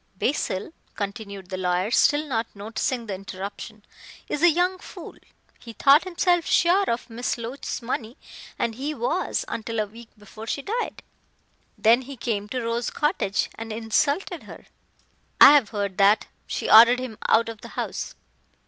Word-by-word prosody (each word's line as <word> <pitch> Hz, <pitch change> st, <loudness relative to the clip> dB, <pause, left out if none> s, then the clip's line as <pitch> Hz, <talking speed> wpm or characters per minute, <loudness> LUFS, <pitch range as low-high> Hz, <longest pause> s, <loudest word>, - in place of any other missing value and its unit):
"Basil;" 240 Hz, -, -2 dB, 0.2 s
continued 200 Hz, -2 st, -6 dB
the 185 Hz, -, -3 dB
lawyer, 180 Hz, +3 st, 0 dB
still 290 Hz, +4 st, +3 dB
not 230 Hz, -6 st, -2 dB
noticing 225 Hz, +4 st, -3 dB
the 205 Hz, -, -4 dB
interruption, 195 Hz, +2 st, -8 dB, 0.4 s
"is 295 Hz, -, -3 dB
a 345 Hz, -, +7 dB
young 360 Hz, +3 st, +1 dB
fool. -, -, -10 dB, 0.4 s
He 230 Hz, -, -11 dB
thought 285 Hz, +8 st, +5 dB
himself 355 Hz, -1 st, +1 dB
sure 365 Hz, +3 st, +3 dB
of 235 Hz, 0 st, -2 dB
Miss 240 Hz, +1 st, -3 dB
Loach's 240 Hz, +2 st, -5 dB
money 230 Hz, +1 st, -4 dB, 0.4 s
and 230 Hz, -, -1 dB
he 280 Hz, +6 st, -4 dB
was -, -, -1 dB
until 230 Hz, 0 st, -4 dB
a 215 Hz, -, +1 dB
week 225 Hz, +3 st, -14 dB
before 210 Hz, +2 st, -11 dB
she 280 Hz, -, -3 dB
died. 465 Hz, -, -4 dB, 0.7 s
Then 230 Hz, +3 st, +4 dB
he 265 Hz, +1 st, -10 dB
came 215 Hz, -3 st, -3 dB
to 250 Hz, +1 st, -3 dB
Rose 230 Hz, +1 st, -1 dB
Cottage 295 Hz, -, 0 dB
and 225 Hz, 0 st, -7 dB
insulted 285 Hz, -, 0 dB
her -, -, -11 dB, 0.4 s
" -, -, -41 dB, 0.3 s
"I -, -, +11 dB
have 275 Hz, -8 st, +4 dB
heard 200 Hz, -3 st, -3 dB
that. 200 Hz, +2 st, +5 dB, 0.2 s
She -, -, -3 dB
ordered 235 Hz, +3 st, +8 dB
him 250 Hz, -4 st, -6 dB
out 230 Hz, +1 st, +4 dB
of 225 Hz, -2 st, -7 dB
the -, -, -9 dB
house." -, -, -4 dB
230 Hz, 165 wpm, -24 LUFS, 210-285 Hz, 0.7 s, I